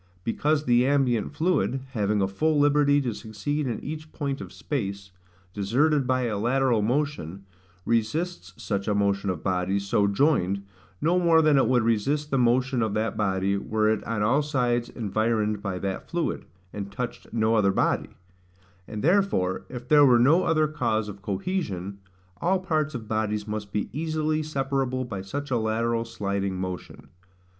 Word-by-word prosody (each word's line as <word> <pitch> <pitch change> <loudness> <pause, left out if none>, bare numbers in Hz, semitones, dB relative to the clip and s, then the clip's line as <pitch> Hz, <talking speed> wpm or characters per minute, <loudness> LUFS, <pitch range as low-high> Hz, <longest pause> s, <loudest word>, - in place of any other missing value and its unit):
Because 145 +7 +1
the 120 +1 +4
ambient 130 -6 +1
fluid, 155 -4 0
having 105 -4 +1
a - - +2
full 155 +11 +1
liberty 145 0 +4
to 120 -4 -2
succeed 125 +8 -3
in 115 -3 -2
each 155 +1 -6
point 140 -2 -3
of - - -8
space, 100 -8 -4 0.4
deserted 130 +8 +1
by 130 0 +1
a 110 -4 -1
lateral 125 0 +2
motion, 115 - -2 0.4
resists 115 - -1
such 100 -2 -3
a 105 - +1
motion 100 -1 +1
of 90 -4 -3
bodies, 95 +1 0
so 100 0 +2
joined, 100 - +1 0.4
no 175 +3 +3
more 170 -2 +5
than 155 -1 +4
it 135 - +4
would 125 -2 +3
resist 140 +7 0
the 135 - +2
motion 125 +1 +2
of 110 -2 0
that 110 +1 -1
body 100 -1 0
were 110 +2 0
it 110 -1 0
on 110 -2 -1
all 130 +7 +3
sides 125 -5 0
environed 110 -1 -1
by 100 -3 -3
that 95 0 -4
fluid, 170 -1 -2 0.3
and 100 -1 -5
touched 125 +4 -6
no 110 -1 +1
other 105 -3 +3
body; - - 0 0.8
and 110 -1 -6
therefore, 165 - +2
if 125 -1 -8
there 150 +1 +6
were 125 -4 +6
no 145 +9 +4
other 155 -2 +3
cause 115 -8 -1
of 100 -1 -9
cohesion, 100 - -3 0.4
all 185 - +1
parts 155 -5 -1
of 110 -3 -6
bodies 105 -1 -1
must 105 -1 -5
be 105 - -1
easily 155 +1 -1
separable 135 -3 -1
by 100 -6 -5
such 140 +9 -5
a 125 - +2
lateral 115 +1 0
sliding 100 -4 -3
motion. 90 -1 -6
115 Hz, 165 wpm, -26 LUFS, 100-145 Hz, 0.8 s, there